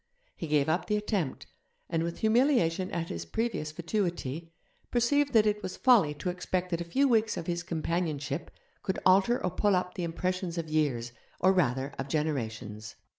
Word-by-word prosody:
He 165 - -5
gave 150 -2 +2
up 160 +3 0
the 210 - +1
attempt, 205 - -2 0.4
and, 165 - 0
with 170 +1 -4
humiliation 220 - +3
at 165 -1 -3
his 85 0 -4
previous 185 - -2
fatuity, 170 -3 -3 0.4
perceived 280 +4 +2
that 220 -2 +6
it 210 0 +1
was 185 -2 -5
folly 210 - +5
to 180 +5 -2
expect 180 0 -2
that 170 0 -1
a - - -3
few 270 +12 +2
weeks 225 -3 +2
of - - -4
his 175 0 -1
companionship 160 -3 -2 0.3
could 190 -2 -2
alter 195 +6 +5
or 180 - 0
pull 205 +2 +2
up 180 0 -1
the 180 - -4
impressions 180 +1 -2
of 165 -2 -3
years, 135 -7 0 0.3
or 190 - +5
rather 135 -6 +1
of 135 - -3
generations. 110 -8 -3
175 Hz, 180 wpm, -29 LUFS, 155-205 Hz, 0.4 s, that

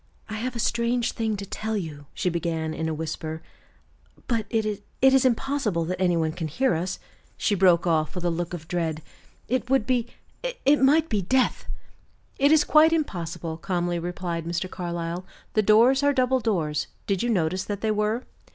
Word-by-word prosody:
"I - - -5
have 250 +2 -3
a - - -4
strange 235 +1 +1
thing 220 -2 -2
to 200 - -5
tell 220 +2 -3
you," 150 -6 -6
she - - -2
began, 165 -2 -2
in 160 0 -2
a - - -1
whisper, 160 0 -5 0.8
"but 230 -3 0
it 215 -3 -1 0.2
is 265 0 +5
impossible 235 - +1
that 180 +2 -3
any 175 -2 +3
one 160 -1 +1
can 165 0 -4
hear 250 - +1
us," 175 +3 -2 0.4
she 210 - +1
broke 180 -3 +4
off, 160 -1 +1
with 180 - -4
a 175 - +2
look 175 +1 -3
of 160 -2 -10
dread. 160 -3 -2 0.4
"It 250 -1 -1
would 270 -5 +3
be 245 -2 +1 0.6
it 285 +1 +5
might 300 +4 +5
be 210 -7 0
death!" 255 +8 +1 0.7
"It 280 +2 +5
is 315 -1 +6
quite 315 +1 +5
impossible," 170 - -3
calmly 175 -1 -1
replied 175 -1 -3
Mr. 170 +2 -2
Carlyle. 175 -1 -4 0.3
"The 215 - +4
doors 230 +6 +5
are 285 0 +3
double 260 -1 +2
doors; 165 -11 -1 0.2
did 195 -3 0
you 240 - 0
notice 185 -3 0
that 205 -1 -4
they 220 - +1
were?" 215 +3 0
190 Hz, 185 wpm, -25 LUFS, 170-240 Hz, 0.8 s, is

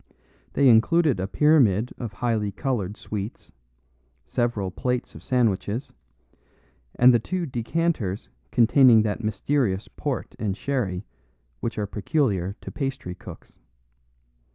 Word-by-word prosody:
They 140 - +4
included 130 - +4
a 95 - -1
pyramid 125 -6 +3
of 115 -4 -5
highly 110 -2 -1
coloured 110 -6 -2
sweets, 105 +1 -6 0.7
several 115 -6 -1
plates 125 +5 -2
of - - -11
sandwiches, 115 -1 0 1.0
and 125 +1 +6
the 120 - +4
two 180 +9 -3
decanters 125 - -2 0.2
containing 120 -1 +6
that 110 +1 -2
mysterious 110 -2 0
port - - -4
and 100 -2 -2
sherry 110 -10 -2 0.5
which 115 - -4
are 105 - 0
peculiar 100 - -1
to - - -8
pastry 135 - -4
cooks. 95 - -13
115 Hz, 115 wpm, -25 LUFS, 100-135 Hz, 1.0 s, and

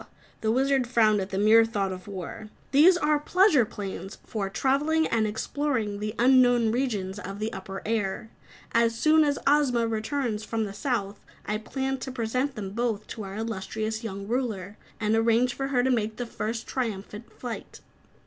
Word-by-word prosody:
The 220 - 0
Wizard 265 +1 +2
frowned 215 -4 +3
at 190 - -4
the 190 - -3
mere 215 +3 +6
thought 205 -4 -1
of 185 +1 -8
war. 200 +2 -7 0.2
"These 330 +6 +6
are 300 -3 +2
pleasure 330 - +4
planes 195 -1 -7
for 200 -3 -3
travelling 295 +8 +1
and 220 -5 +1
exploring 220 -1 -2
the 210 +1 -4
unknown 245 -2 +5
regions 210 -6 -2
of 195 -1 -6
the 215 +2 -3
upper 195 0 -7
air. 220 0 -2 0.4
As 230 0 +3
soon 310 +4 +5
as 285 -1 +1
Ozma 275 -5 +3
returns 225 0 -2
from 225 0 -2
the 200 -2 -5
South, 205 -3 -2 0.3
I 210 +1 -1
plan 265 +4 -3
to 260 - -5
present 255 +3 -1
them 200 -3 -5
both 225 -1 -1
to 225 - -6
our 195 0 -7
illustrious 220 +1 -3
young 200 -2 -5
Ruler 215 -5 -2 0.2
and 215 0 +1
arrange 230 +2 +3
for 270 - -3
her 255 -3 +1
to 260 - +2
make 220 -3 0
the 245 - -4
first 230 0 -4
triumphant 220 -2 -4
flight." 240 -3 -7
225 Hz, 175 wpm, -27 LUFS, 210-260 Hz, 0.4 s, mere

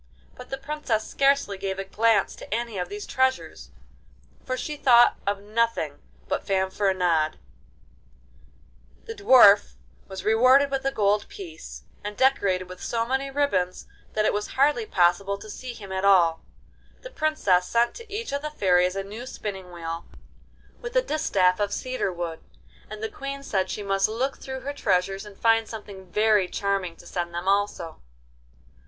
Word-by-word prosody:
But 250 - -12
the 270 - -3
Princess 270 -6 -2
scarcely 275 -8 +1
gave 190 0 -3
a 195 - -3
glance 220 +3 +2
to - - -11
any 230 -2 -2
of 180 0 -3
these 205 +1 -6
treasures, 260 0 -1 0.7
for 255 0 -3
she 300 +3 -4
thought 240 -4 +5
of 200 0 0
nothing 215 -9 -1 0.3
but - - -2
Fanfaronade. 190 -4 +1 1.7
The 225 - -6
Dwarf 205 - +6 0.3
was 190 -1 -7
rewarded 255 +6 +5
with 270 -1 -1
a 270 - +2
gold 205 -3 +1
piece, 155 - -10 0.2
and 210 0 -6
decorated 200 -9 +2
with 185 0 -10
so 230 -1 -1
many 265 +3 -1
ribbons 230 -11 0 0.3
that 215 0 +1
it - - +2
was 210 0 -2
hardly 295 - +3
possible 190 - +2
to 215 +1 -10
see 255 +2 -7
him 200 -4 -10
at 190 0 -2
all. 175 -5 +4 0.6
The - - -9
Princess 205 - +1
sent 235 0 +2
to 465 -2 -12
each 435 +2 -4
of 280 - -1
the 300 - -4
fairies 180 -9 +2
a 195 - -2
new 215 +6 -8
spinning 190 -6 -6
wheel 165 -1 -6 0.7
with 485 0 -7
a - - +4
distaff 190 - +1
of 205 -1 0
cedar 255 -4 -2
wood, 170 -2 -5 0.5
and 215 +1 -8
the - - 0
Queen 275 +4 -7
said 190 -7 -1
she 210 - -4
must 195 0 +1
look 255 +5 -2
through 265 -1 -6
her 285 - -4
treasures 195 -4 0
and 200 -1 -13
find 225 -1 +3
something 200 -4 -10
very 210 -3 +3
charming 195 -3 -2
to - - -16
send 175 -1 -4
them 175 +2 -4
also. 200 -5 0
205 Hz, 165 wpm, -25 LUFS, 190-255 Hz, 1.7 s, Dwarf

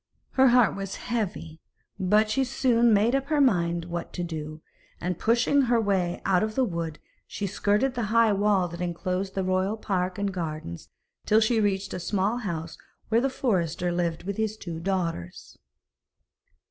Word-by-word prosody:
Her 265 0 +5
heart 245 -1 +4
was 195 0 -5
heavy, 195 -9 -4 0.4
but 210 +4 +3
she 265 +5 +1
soon 240 -2 +2
made 215 +3 +3
up 275 0 0
her 300 0 +1
mind 170 -10 +2
what 170 0 -5
to 175 - -3
do, 155 -2 -6 0.4
and 180 -1 -3
pushing 240 +5 +3
her 240 -1 +4
way 190 -5 0
out 185 -2 +3
of 215 0 -2
the 265 - +3
wood, 170 -7 -3 0.3
she 205 - -4
skirted 205 +6 +1
the 240 -3 -2
high 230 -1 +4
wall 200 -2 +2
that 170 +1 -8
enclosed 180 +2 -3
the 190 - 0
royal 185 +3 0
park 185 -3 -2
and 200 -1 -2
gardens, 155 - -5 0.4
till 215 - +5
she 225 0 +2
reached 195 -1 -1
a - - -3
small 200 +5 0
house 170 -8 -5 0.3
where 225 +1 +3
the 270 - +1
forester 180 - -1
lived 170 -1 -1
with 200 +1 -4
his 220 -1 -1
two 170 -6 -6
daughters. 170 - -4
195 Hz, 170 wpm, -26 LUFS, 175-225 Hz, 0.4 s, Her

